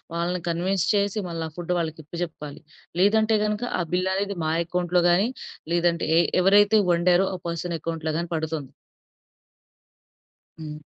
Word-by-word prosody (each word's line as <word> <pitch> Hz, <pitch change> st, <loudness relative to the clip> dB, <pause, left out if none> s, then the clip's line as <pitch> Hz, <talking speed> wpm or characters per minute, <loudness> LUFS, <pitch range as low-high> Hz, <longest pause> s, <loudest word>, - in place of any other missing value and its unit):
వాళ్ళని 175 Hz, +1 st, -1 dB
కన్విన్స్ 180 Hz, +2 st, 0 dB
చేసి, 200 Hz, +1 st, 0 dB
మళ్ళ 165 Hz, -1 st, -4 dB
ఆ -, -, -22 dB
ఫుడ్ 175 Hz, 0 st, -2 dB
వాళ్ళకి 160 Hz, -1 st, -4 dB
ఇప్పచెప్పాలి. 160 Hz, -3 st, -6 dB, 0.4 s
లేదంటే 220 Hz, +2 st, +4 dB
గనుగ 210 Hz, +2 st, -2 dB, 0.2 s
ఆ -, -, +1 dB
బిల్ 185 Hz, +1 st, +1 dB
అనేది 200 Hz, 0 st, -2 dB
మా 155 Hz, -, +1 dB
అకౌంట్లో 180 Hz, +1 st, +1 dB
గానీ, 185 Hz, +5 st, +3 dB, 0.5 s
లేదంటే 170 Hz, -1 st, +1 dB
ఎ -, -, +6 dB, 0.2 s
ఎవరైతే 205 Hz, +3 st, +5 dB
వండారో 175 Hz, +2 st, +3 dB
ఆ -, -, -5 dB
పర్సన్ 170 Hz, 0 st, -3 dB
అకౌంట్లో 160 Hz, -1 st, -3 dB
గానీ 170 Hz, -, -3 dB
పడుతుంది. 155 Hz, -3 st, -4 dB, 1.9 s
హ్మ్. 150 Hz, -1 st, -7 dB
175 Hz, 145 wpm, -24 LUFS, 165-195 Hz, 1.9 s, ఎ